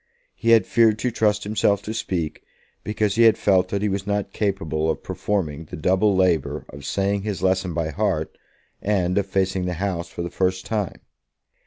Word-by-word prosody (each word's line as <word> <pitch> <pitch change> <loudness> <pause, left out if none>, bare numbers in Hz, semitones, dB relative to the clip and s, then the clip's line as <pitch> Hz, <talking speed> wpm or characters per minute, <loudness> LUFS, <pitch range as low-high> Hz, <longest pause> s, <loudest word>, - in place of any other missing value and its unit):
He 115 - -2
had 115 -1 +6
feared 115 -2 +4
to 125 +3 -1
trust 105 -2 +1
himself 100 -1 +1
to 110 - -4
speak, 85 -8 -3 0.4
because 105 0 -1
he - - +4
had 115 -1 +6
felt 95 -2 +3
that 100 +2 -2
he - - +2
was 100 0 -2
not 105 -1 -1
capable 80 -7 -1
of - - -2
performing 80 -7 -2
the - - -8
double 95 +5 +2
labour 90 -6 +1
of 70 -1 -10
saying 100 +5 0
his 100 -2 -4
lesson 95 -2 +1
by 80 -2 -1
heart, 95 -5 -1 0.5
and 95 -3 +1
of 100 - -2
facing 95 -1 0
the 90 - -1
House 90 -1 -2
for 85 - -6
the 85 - -5
first 95 0 0
time. 105 -4 -3
95 Hz, 190 wpm, -23 LUFS, 90-105 Hz, 0.5 s, had